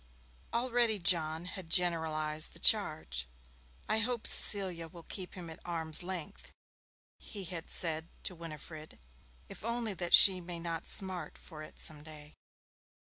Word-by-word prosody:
Already 235 -2 0
John 170 -3 +2
had 185 -2 -8
generalized 160 -3 0
the - - -10
charge. 155 - +2 0.6
'I 220 - 0
hope 235 0 -2
Cecilia 185 -5 +5
will 170 +1 -13
keep 185 +2 -8
him 180 -2 -9
at 160 - -10
arm's 160 -2 +3
length,' 180 -3 -6 0.7
he 200 -2 -7
had 170 -2 -6
said 160 -1 -1
to - - -4
Winifred, 155 -2 -10 0.5
'if - - -11
only 230 -1 -2
that 175 -2 +4
she 185 -2 +7
may 175 0 -7
not 165 -1 -5
smart 185 -2 -3
for 155 -3 -12
it 155 - -12
some 150 -1 -1
day.' 150 -1 -12
170 Hz, 140 wpm, -31 LUFS, 160-190 Hz, 0.7 s, she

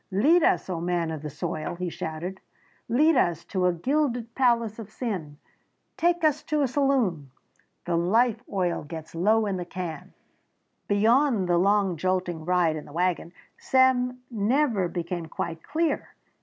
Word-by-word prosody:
"Lead 280 - +4
us, - - +2
O 175 -3 -3
man 175 -2 -1
of 155 -2 -5
the 150 - -5
soil!" 155 +3 -4
he 180 0 -4
shouted, 170 +5 -5 0.5
"Lead 300 +7 +4
us 170 - +1
to 185 -2 0
a - - +4
gilded 245 - -1
palace 235 -4 +1
of 220 -2 -8
sin! 185 - -5 0.6
Take 345 0 +1
us 305 -1 +3
to 305 -2 +1
a - - +2
saloon! 245 - 0 0.6
The 175 - 0
life 220 +7 +2
oil 180 -3 -1
gets 160 +1 -9
low 215 +6 +2
in 195 -2 -1
the 180 - -3
can!" 170 -4 -7 0.7
Beyond 225 0 +3
the 175 -1 +3
long, 195 -2 +2
jolting 180 -2 -1
ride 175 -3 +2
in 150 - -8
the - - -13
wagon 175 0 -1 0.3
Sam 250 -1 +2
never 225 -2 +1
became 170 -1 -4
quite 165 +1 -5
clear. 320 - -1
190 Hz, 155 wpm, -26 LUFS, 170-250 Hz, 0.7 s, Lead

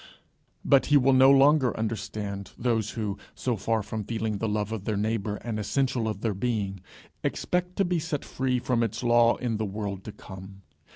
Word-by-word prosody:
But 140 -1 +4
he 145 - +6
will 135 0 +4
no 130 +1 +7
longer 140 -1 +5
understand 105 -2 -4
those 115 -3 0
who, 105 -3 -2 0.2
so 125 -2 -1
far 110 +1 0
from 110 +1 -4
feeling 110 -1 -2
the 115 - -1
love 105 0 -1
of 110 -3 -4
their 110 -2 -1
neighbour 105 0 -1
an 110 0 -4
essential 125 +1 0
of 105 -2 -3
their 110 -3 0
being, 100 -2 -2 0.4
expect 180 0 -1
to 195 - +2
be 175 -1 0
set 150 -2 -3
free 130 -1 -1
from 125 -1 0
its 115 +1 -2
law 120 0 +5
in 120 -3 -2
the 110 - -2
world 100 -1 -4
to 110 - -6
come. 95 0 -11
115 Hz, 190 wpm, -27 LUFS, 105-125 Hz, 0.4 s, no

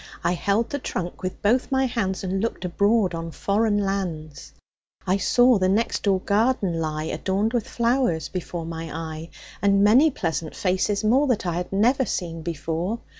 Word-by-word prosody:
I - - +2
held 200 +6 0
the 285 - -2
trunk 175 -8 -5
with 185 -1 -5
both 245 +7 +2
my 265 0 +2
hands 205 -7 -2
And 190 +1 -1
looked 230 -4 -3
abroad 200 +1 +2
on 165 0 -4
foreign 205 +5 0
lands. 180 -7 -3 0.5
I 185 +2 +2
saw 245 +2 +4
the 185 0 +2
next 215 +4 +1
door 195 -2 +2
garden 200 -5 +1
lie, 155 -1 -2
Adorned 195 +7 -1
with 235 -3 -1
flowers, 235 -8 +1
before 175 -2 -5
my 165 0 -6
eye, 160 0 -6 0.3
And 200 0 +4
many 250 +10 +6
pleasant 165 - -3
faces 190 +2 0
more 260 +7 +3
That 245 -7 0
I 175 - -1
had 180 +1 -4
never 240 +7 +3
seen 165 -3 -3
before. 165 +5 -3
195 Hz, 175 wpm, -24 LUFS, 170-225 Hz, 0.5 s, many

